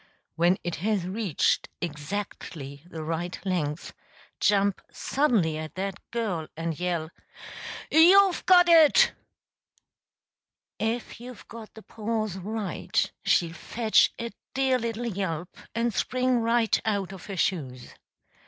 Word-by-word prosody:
When 175 +3 +3
it 175 -1 -3
has 200 0 0
reached 190 -2 0
exactly 150 -3 -6
the 160 -3 -6
right 165 +3 -3
length, 165 -5 -2 0.5
jump 200 -1 +2
suddenly 215 - +1
at 155 0 -7
that 195 0 -3
girl 200 -9 -2
and 165 -1 -3
yell, 170 -3 -2 0.8
"You've 370 +3 +6
got 355 -1 +7
it!") 325 -3 +6 1.7
If 225 +1 -2
you've 245 -1 -11
got 225 -1 -11
the 220 - -12
pause 215 -2 -3
right, 205 -1 -2
she'll 170 -2 +2
fetch 220 +5 +2
a 235 0 -4 0.2
dear 265 -1 +2
little 230 0 -3
yelp 185 -6 -3 0.2
and 230 0 0
spring 255 +2 +1
right 230 0 +2
out 200 -4 -1
of 190 -3 -10
her 195 -2 -6
shoes. 130 -10 -2
200 Hz, 120 wpm, -27 LUFS, 170-230 Hz, 1.7 s, got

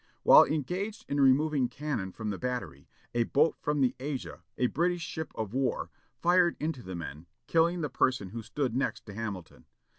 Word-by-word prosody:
While - - +9
engaged 190 - -3
in 140 0 0
removing 135 -1 +4
cannon 140 -10 -3
from 110 +2 -4
the 95 - -5
battery, 125 - -4 0.3
a 120 -1 +2
boat 150 +6 +3
from 150 -1 0
the 130 -1 +3
Asia, 135 0 -5 0.2
a 125 - +2
British 170 +6 0
ship 160 -1 -5
of 110 -1 -4
war, 130 -1 -1 0.3
fired 175 +4 +3
into 155 -4 -2
the 95 -3 -7
men, 80 -1 -7 0.2
killing 170 +1 +2
the 150 - 0
person 130 -9 +1
who 115 +4 -6
stood 115 +2 -2
next 135 - -1
to 105 - -9
Hamilton. 100 -6 -6
130 Hz, 180 wpm, -30 LUFS, 110-155 Hz, 0.3 s, While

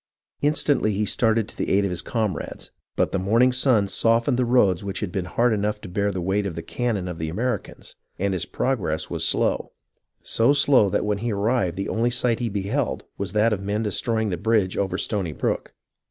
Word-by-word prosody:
Instantly 145 -6 +2
he 105 +2 0
started 110 0 +2
to - - -14
the - - -3
aid 100 +1 +3
of 100 - -1
his 90 -1 -2
comrades, 105 -2 -3 0.2
but - - +1
the 95 - 0
morning 115 +7 +3
sun 125 -5 +2
softened 115 +4 +2
the 125 0 +1
roads 105 -7 +3
which 100 -1 -4
had 100 -4 -3
been 95 -1 -2
hard 115 +6 +1
enough 105 0 -1
to 105 - -9
bear 100 +3 0
the 95 - -4
weight 100 +2 0
of 85 - -5
the 85 - -5
cannon 105 0 -2
of 90 -2 -6
the 80 0 -3
Ameri 115 +3 -1
cans, - - -14 0.2
and 100 +1 0
his 90 - -2
progress 105 -12 -1
was - - -1
slow, - - 0 0.5
so 115 +5 +3
slow 135 -7 +5
that - - 0
when 105 -1 0
he 115 +2 -2
arrived 100 -3 0
the 100 - -2
only 115 +2 +1
sight 120 -1 0
he 120 -2 -1
beheld 105 +7 -2 0.2
was 100 0 -3
that 105 +1 +3
of 100 - -3
men 105 +3 -1
destroy 110 +2 -1
ing 110 - 0
the 90 - -2
bridge 105 -1 +1
over 100 -1 -1
Stony 95 -8 -2
Brook. - - -3
105 Hz, 220 wpm, -24 LUFS, 95-115 Hz, 0.5 s, slow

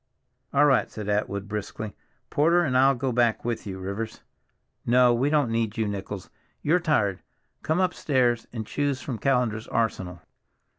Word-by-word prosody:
"All 145 +1 +5
right," 135 -3 +3
said 105 -2 -7
Atwood 100 -1 -1
briskly. 105 0 -5 0.4
"Porter 170 +4 +4
and 130 -6 0
I'll 135 +1 +5
go 130 +1 -1
back 120 -2 +1
with 120 -2 -3
you, 95 -1 -5
Rivers. 100 +4 -5 0.6
No, 125 0 +5
we 130 +4 +1
don't 145 -6 +2
need 115 -2 -1
you, 110 -1 0
Nichols, 100 -1 -5 0.3
you're 165 +5 +3
tired. 120 - +1 0.4
Come 160 +3 0
upstairs 130 -10 +1
and 115 -2 -5
choose 140 +3 -1
from 125 -4 -5
Callender's 125 -5 0
arsenal." 95 -6 -2
120 Hz, 155 wpm, -26 LUFS, 105-135 Hz, 0.6 s, All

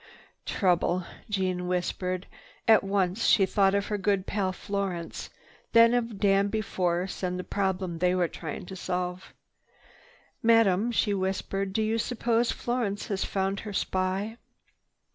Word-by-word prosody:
"Trouble," 180 -1 +1 0.2
Jeanne 185 -3 -1
whispered. 180 +1 -2 0.4
At 220 -3 +6
once 195 +1 0
she 200 -4 +5
thought 195 0 +3
of 200 0 +1
her 210 -1 -2
good 195 -1 +1
pal 195 -3 -1
Florence, 190 -3 -4 0.4
then 230 0 +7
of 230 -3 -1
Danby 200 +2 +2
Force 180 -2 -1
and 180 -1 -1
the 180 - -4
problem 190 -4 -2
they 180 +1 +2
were 180 -2 +2
trying 165 +3 -6
to 190 - -8
solve. 180 0 -4 1.1
"Madame," 225 -1 +4
she 210 -3 +1
whispered, 195 0 -2
"do 220 +3 0
you 220 +1 0
suppose 235 0 +1
Florence 235 -5 -2
has 195 -2 0
found 195 0 -1
her 210 -2 -7
spy?" 190 +4 -1
195 Hz, 140 wpm, -28 LUFS, 185-210 Hz, 1.1 s, then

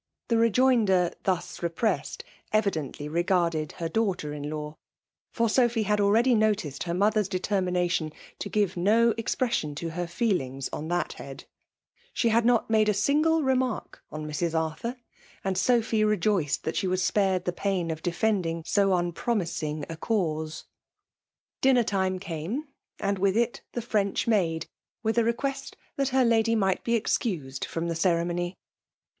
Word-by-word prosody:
The 230 - +3
rejoinder, 225 -6 +3
thus 185 -3 -1
repressed, 170 +6 -1 0.3
evidently 160 -9 -1
regarded 170 -1 0
her 165 - -3
daixghter 180 -6 -1
in*law; 150 +1 -5 0.5
for 230 -1 +1
Sophy 235 -1 +2
had 210 0 +1
already 225 +5 +4
noticed 210 - +1
her 170 - -2
mother's 210 +1 +2
detenmnatioii 180 -4 0 0.3
to - - -4
give 205 -4 +1
no 220 +6 +4
expression 230 - -1
to 165 +2 -4
her 175 +1 -3
feelings 165 - -1
on 155 - -4
that 175 +1 -1
head. - - -10 0.7
She 235 - +2
had 230 +1 +3
not 240 -2 +3
made 215 -1 +3
a - - +3
sin^ 300 +9 +2
remark 260 -3 -1
on 155 0 -5
Mrs. 160 +2 -1
Arthur; 160 +10 -3 0.5
anci 190 +3 0
Skqihy 215 -2 +1
re^ieed 175 -6 +1
thai 160 - -1
she 190 - -1
was 185 0 0
epared 190 -2 +2
die 180 - -1
pam 180 -2 -1
ef 160 0 -5
defimdiag 175 -2 0 0.2
ao 200 - +4 0.2
nnpromisiBg 165 -8 -2
a 165 - -7
cause. 160 -6 -2 1.0
Bianer 255 -3 +4
time 190 -2 0
came, 190 - -4 0.3
and 200 -1 -1
with 195 +2 +2
it 235 0 0
the 240 - -2
Frendk 210 -4 0
maad» 170 -8 +1 0.4
with 225 +1 +2
a - - +3
request 275 +4 -2 0.2
that 275 -1 0
her 260 -1 +3
lady 230 0 +3
might 190 -3 +1
be 235 -1 +2
CDBoued 150 - -2
fiom 170 +1 -3
Ae - - 0
ceremony. 175 +1 0
195 Hz, 150 wpm, -27 LUFS, 165-225 Hz, 1.0 s, already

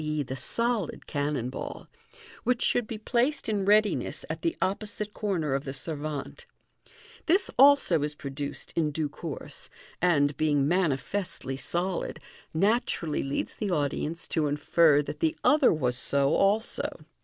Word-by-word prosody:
e., 155 -1 -1
the 130 0 -5
solid) 230 - -1
cannon 145 -4 -2
ball, - - -7 0.6
which 250 -1 +1
should 245 -3 +3
be 225 - -5
placed 250 +6 0
in 205 -3 0
readiness 210 +1 +2
at - - -5
the 335 0 -1
opposite 210 +2 -2
corner 175 -9 -1
of 135 0 -1
the 135 -1 -6
servante. 155 - -5 0.8
This 375 +4 +3
also 275 - +6
is 150 0 -2
produced 140 0 -6
in 160 -3 +2
due 150 0 -2
course, 150 0 -6 0.3
and, 145 -5 +3
being 145 -3 +2
manifestly 175 -2 -1
solid, 175 +6 -2 0.3
naturally 190 - +1
leads 135 +1 -3
the 210 - -2
audience 160 +1 -1
to 155 -3 +1
infer 150 +1 +4
that - - -7
the 325 0 +1
other 300 -2 +5
was 125 -6 0
so 140 +1 +2
also. 210 +3 0
165 Hz, 145 wpm, -28 LUFS, 145-215 Hz, 0.8 s, also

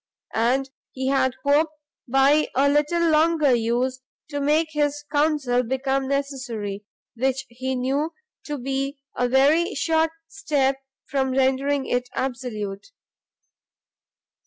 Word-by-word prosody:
And 250 +4 +1 0.3
he 260 0 -2
had 260 -2 +2
hoped, 300 +2 +3 0.3
by 275 +4 +4
a 275 +2 +4
little 300 +4 +2
longer 310 -3 +4
use, 245 +3 0 0.3
to 285 0 -2
make 305 +3 +2
his 295 -1 -1
counsel 290 -5 +2
become 265 +2 -1
necessary, 255 -8 -3 0.3
which 265 +2 0
he 260 +2 -3
knew 275 +5 0 0.3
to 295 -1 -3
be 275 +2 -2 0.2
a 245 0 0
very 300 +9 +3
short 320 0 +2 0.2
step 290 -8 0 0.3
from 265 -1 -1
rendering 270 +1 +1
it 245 0 -1
absolute. 230 -6 -4
270 Hz, 115 wpm, -24 LUFS, 255-295 Hz, 0.3 s, by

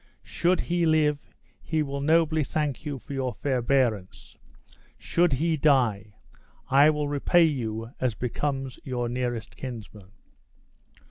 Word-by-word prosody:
Should 180 +1 +1
he 175 -1 0
live, 150 -2 +3 0.4
he 160 -1 -1
will 140 -1 -4
nobly 155 +1 +3
thank 145 -1 -3
you 145 -2 -3
for 135 - -10
your 130 -4 -2
forbearance; 120 -4 -1 0.6
should 175 -3 +1
he 160 +4 +1
die, 115 -8 +2 0.6
I 140 +3 +7
will 150 -1 0
repay 145 +4 +3
you 115 -6 -3
as 125 -4 0
becomes 135 +2 -3
your 125 -2 -2
nearest 120 -2 -3
kinsman." 110 -6 -9
135 Hz, 125 wpm, -26 LUFS, 120-155 Hz, 0.6 s, I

